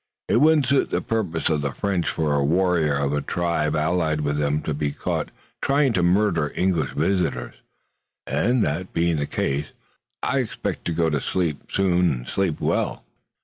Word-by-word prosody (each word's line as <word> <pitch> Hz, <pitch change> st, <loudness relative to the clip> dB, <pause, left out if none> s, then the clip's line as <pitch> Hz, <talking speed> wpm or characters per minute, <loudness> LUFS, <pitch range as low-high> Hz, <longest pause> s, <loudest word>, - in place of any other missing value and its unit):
It -, -, +3 dB
wouldn't 150 Hz, +1 st, +5 dB
suit 135 Hz, +2 st, +2 dB
the -, -, 0 dB
purposes 95 Hz, -9 st, -1 dB
of 75 Hz, -2 st, +1 dB
the 70 Hz, -2 st, -2 dB
French 95 Hz, 0 st, -1 dB
for 75 Hz, -2 st, 0 dB
a 70 Hz, -1 st, +2 dB
warrior 85 Hz, -1 st, +2 dB
of 70 Hz, 0 st, 0 dB
a 75 Hz, -, 0 dB
tribe 85 Hz, -3 st, -1 dB
allied 80 Hz, -1 st, +1 dB
with 75 Hz, 0 st, -1 dB
them 75 Hz, +1 st, 0 dB
to 75 Hz, -, -2 dB
be 75 Hz, 0 st, -1 dB
caught -, -, -3 dB, 0.3 s
trying 140 Hz, -2 st, +2 dB
to 95 Hz, -, +1 dB
murder 90 Hz, -4 st, +2 dB
English 90 Hz, -3 st, 0 dB
visitors, 90 Hz, +3 st, 0 dB, 0.7 s
and, 110 Hz, -, +1 dB
that 85 Hz, +6 st, -2 dB
being 85 Hz, -1 st, +1 dB
the 70 Hz, -1 st, -1 dB
case, 70 Hz, +2 st, -1 dB, 0.6 s
I -, -, +1 dB
expect -, -, -3 dB
to -, -, -1 dB
go 80 Hz, 0 st, +1 dB
to 75 Hz, -2 st, 0 dB
sleep 85 Hz, -6 st, -2 dB
soon 90 Hz, -2 st, +2 dB
and -, -, -5 dB
sleep 95 Hz, -5 st, -1 dB
well." -, -, -1 dB
85 Hz, 180 wpm, -23 LUFS, 75-95 Hz, 0.7 s, wouldn't